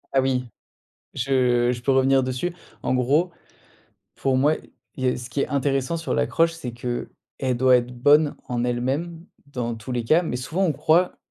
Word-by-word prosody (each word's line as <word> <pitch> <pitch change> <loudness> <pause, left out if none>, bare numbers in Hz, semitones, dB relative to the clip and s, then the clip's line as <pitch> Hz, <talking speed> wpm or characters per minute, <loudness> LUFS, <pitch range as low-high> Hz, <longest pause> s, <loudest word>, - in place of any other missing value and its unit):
Ah 135 - +5
oui. 130 -1 0 0.7
Je 125 -2 +2
je 120 -1 -6
peux 135 - +1
revenir 135 0 +4
dessus. 130 +7 -2 0.3
En - - 0
gros, 145 +8 +2 0.8
pour 135 -1 0
moi, 145 +4 +3 0.4
il 130 - -5
y - - +3
a - - -1
ce 125 0 -8
qui 130 +3 -1
est - - 0
intéressant 135 +3 0
sur 165 - -3
l'accroche, 165 0 +2
c'est 150 -7 -6
qu'elle 125 +1 -4
doit 130 0 +5
être 120 0 -3
bonne 145 +4 +4
en 120 -1 -1
elle-même, 135 +8 -2 0.2
dans 120 -4 -3
tous 115 +3 -8
les 120 -2 -2
cas, 155 +8 +4
mais 125 - -3
souvent, 155 +10 -2
on 170 - +2
croit 165 +5 +2
130 Hz, 185 wpm, -23 LUFS, 125-150 Hz, 0.8 s, Ah